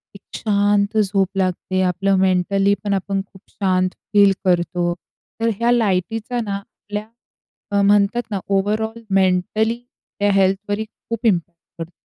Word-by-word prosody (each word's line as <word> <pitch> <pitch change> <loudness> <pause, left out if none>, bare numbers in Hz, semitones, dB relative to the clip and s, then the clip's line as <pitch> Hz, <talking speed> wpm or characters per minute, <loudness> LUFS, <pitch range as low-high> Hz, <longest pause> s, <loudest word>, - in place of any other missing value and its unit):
एक 200 - -12
शांत 205 0 +1
झोप 195 -2 +1
लागते, 185 0 0
आपलं 190 +2 +1
मेंटली 190 +2 +2
पण 205 -1 0
आपण 195 0 -1
खूप 190 -1 -18
शांत 185 -2 +1 0.2
फील 200 -1 +6
करतो, 175 -1 +1 0.5
तर 230 - +2
ह्या 235 +1 +3
लाइटीचा 225 +2 0
ना 200 -1 -2
आपल्या 205 +1 -7 0.7
अ, 200 - +4
म्हणतात 205 +3 +3
ना 200 - -1
ओव्हरऑल 215 +3 0
मेंटली 195 +4 +2 0.4
त्या 205 0 +3
हेल्थवर 195 +1 +1
ही 220 - -2
खूप 230 +1 -8
इम्पॅक्ट 175 -5 +1 0.2
करतो. 165 - -13
200 Hz, 140 wpm, -20 LUFS, 185-210 Hz, 0.7 s, फील